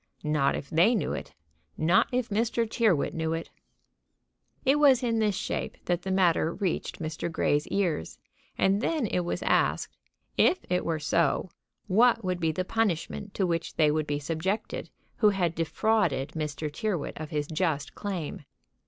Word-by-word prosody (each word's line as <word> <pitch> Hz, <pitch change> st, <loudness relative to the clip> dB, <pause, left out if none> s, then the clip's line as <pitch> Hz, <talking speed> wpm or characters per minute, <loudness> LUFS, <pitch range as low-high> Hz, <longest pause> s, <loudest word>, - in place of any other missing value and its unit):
Not 150 Hz, -2 st, +2 dB
if 140 Hz, -, -5 dB
they 175 Hz, +9 st, +4 dB
knew 180 Hz, -9 st, -1 dB
it! -, -, -7 dB, 0.4 s
Not 170 Hz, +4 st, +4 dB
if 250 Hz, -1 st, -1 dB
Mr. 230 Hz, +2 st, 0 dB
Tyrrwhit 215 Hz, -9 st, +1 dB
knew 160 Hz, -1 st, -1 dB
it! 165 Hz, 0 st, -5 dB, 1.1 s
It 275 Hz, +3 st, +4 dB
was 270 Hz, -4 st, +5 dB
in 230 Hz, -2 st, +1 dB
this 210 Hz, -3 st, +2 dB
shape -, -, -3 dB
that 175 Hz, 0 st, 0 dB
the 190 Hz, -, -5 dB
matter 180 Hz, -4 st, +3 dB
reached 190 Hz, -3 st, -2 dB
Mr. 160 Hz, +1 st, -4 dB
Grey's 150 Hz, -2 st, +1 dB
ears; 175 Hz, -, -1 dB, 0.4 s
and 195 Hz, +2 st, +2 dB
then 310 Hz, -2 st, 0 dB
it 185 Hz, -, 0 dB
was 175 Hz, -1 st, -2 dB
asked, -, -, +1 dB, 0.4 s
if 370 Hz, -, +5 dB
it 180 Hz, -, +2 dB
were 165 Hz, -1 st, -1 dB
so, 155 Hz, +2 st, +1 dB, 0.3 s
what 230 Hz, +3 st, +4 dB
would 180 Hz, -1 st, -1 dB
be 165 Hz, -2 st, +1 dB
the 185 Hz, +4 st, -2 dB
punishment 205 Hz, -1 st, -1 dB
to 195 Hz, -, +1 dB
which 170 Hz, -2 st, -2 dB
they 155 Hz, -2 st, +4 dB
would 155 Hz, 0 st, -1 dB
be 145 Hz, -, 0 dB
subjected 165 Hz, +8 st, -3 dB, 0.3 s
who 210 Hz, -, +5 dB
had 180 Hz, -5 st, 0 dB
defrauded 165 Hz, -4 st, +1 dB
Mr. 150 Hz, -1 st, -3 dB
Tyrrwhit 185 Hz, -3 st, -2 dB
of 155 Hz, -1 st, -5 dB
his 150 Hz, -2 st, -1 dB
just 155 Hz, -2 st, -1 dB
claim. 185 Hz, -8 st, -5 dB
175 Hz, 165 wpm, -28 LUFS, 155-210 Hz, 1.1 s, was